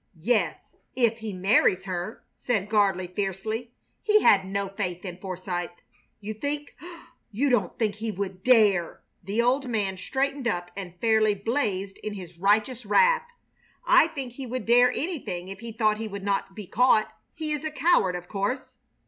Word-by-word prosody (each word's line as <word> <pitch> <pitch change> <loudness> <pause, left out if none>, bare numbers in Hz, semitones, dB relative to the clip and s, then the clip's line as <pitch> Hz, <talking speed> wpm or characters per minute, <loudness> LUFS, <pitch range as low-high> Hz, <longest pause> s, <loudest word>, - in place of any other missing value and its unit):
"Yes, 235 +2 0 0.2
if 235 -3 +2
he 220 -1 -5
marries 190 0 +3
her," 185 +3 -5
said 210 -5 -1
Gardley, 200 -4 +2
fiercely. 215 +4 -3 0.3
He 425 -1 +4
had 190 -2 +5
no 200 +1 -2
faith 185 -2 -4
in 180 -2 -6
Forsythe. 185 -2 -4 0.5
"You 215 +1 -5
think 290 +6 -4 0.6
you 265 +6 +1
don't 245 - +1
think 220 -4 0
he 220 +1 -5
would 190 -2 -5
dare!" 210 -9 +3 0.2
The 205 +6 0
old 260 +3 +1
man 205 -5 -1
straightened 270 +5 -2
up 175 -5 -2
and 180 -3 -8
fairly 220 -2 +3
blazed 200 -3 -2
in 210 -1 -5
his 175 -3 -10
righteous 215 +6 +2
wrath. 475 - +3 0.6
"I - - +6
think 275 -7 -6
he 260 0 -7
would 255 +2 -4
dare 245 +1 +5
anything 250 - -4
if 195 0 -8
he 230 +1 -7
thought 215 -1 +1
he 225 0 -4
would 200 -1 -7
not 195 -1 -1
be 210 - -7
caught. 235 +1 +3 0.2
He 310 -1 -4
is 300 -1 -2
a 310 - -1
coward, 300 - +2
of 175 0 -7
course." 205 +8 -3
215 Hz, 170 wpm, -26 LUFS, 195-250 Hz, 0.6 s, I